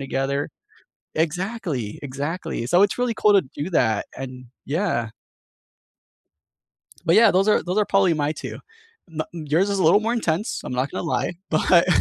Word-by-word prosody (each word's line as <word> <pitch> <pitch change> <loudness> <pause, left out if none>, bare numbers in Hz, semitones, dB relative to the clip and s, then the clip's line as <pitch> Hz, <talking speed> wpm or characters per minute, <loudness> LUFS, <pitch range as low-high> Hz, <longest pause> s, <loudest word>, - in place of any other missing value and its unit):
together. 135 +1 -2 0.7
Exactly, 165 - -2
exactly. 145 +1 -4
So, 175 +7 +5
it's 205 - +1
really 245 -2 0
cool 210 -1 +4
to 200 - +6
do 150 +5 -3
that, 110 -10 +2
and 130 -1 -7 0.2
yeah. 140 - -1 2.0
But, 165 +4 +4
yeah, 225 -1 +7
those 195 +3 +2
are - - +4
those 180 +4 -1
are 210 - +4
probably 195 -4 +3
my 150 -1 0
2. - - -7 0.5
No 160 -1 -4
yours 165 +3 0
is 200 - 0
a 180 - +1
little 185 +6 +6
more 225 +2 -1
intense. 210 -3 -1
I'm - - -5
not 130 +2 -1
gonna - - -4
lie, 170 +1 -1 0.2
but 170 +2 +4
165 Hz, 165 wpm, -23 LUFS, 140-195 Hz, 2.0 s, yeah